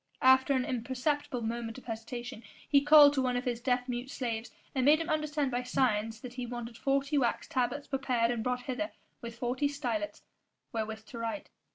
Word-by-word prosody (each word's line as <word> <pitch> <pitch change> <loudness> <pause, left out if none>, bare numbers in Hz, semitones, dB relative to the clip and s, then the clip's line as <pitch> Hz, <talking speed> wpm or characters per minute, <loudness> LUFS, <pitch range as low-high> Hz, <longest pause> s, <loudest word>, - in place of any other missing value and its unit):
After 260 +2 +6
an 255 -1 +1
imperceptible 260 +1 -1
moment 230 0 -3
of 260 - -12
hesitation, 235 +1 -6 0.3
he 280 -2 +5
called 295 0 +8
to 270 - +1
one 250 -1 +1
of 245 - -3
his 240 -1 -2
deaf 250 0 +1
mute 245 +1 -3
slaves 235 -4 -3 0.2
and 260 - +1
made 295 +4 +6
him 330 - -3
understand 300 -3 0
by 245 0 0
signs 225 -3 0
that 250 -1 -8
he 250 -1 -5
wanted 240 -1 -6
forty 275 +3 +1
wax 240 -3 0
tablets 265 +3 -1
prepared 255 -4 +1
and 230 -2 -2
brought 250 0 -1
hither 290 +5 -3 0.3
with 235 0 -7
forty 250 +4 0
stylets 290 +2 -3 0.5
wherewith 220 -1 -3
to 235 - -9
write. 230 +6 -4
250 Hz, 190 wpm, -31 LUFS, 235-275 Hz, 0.5 s, called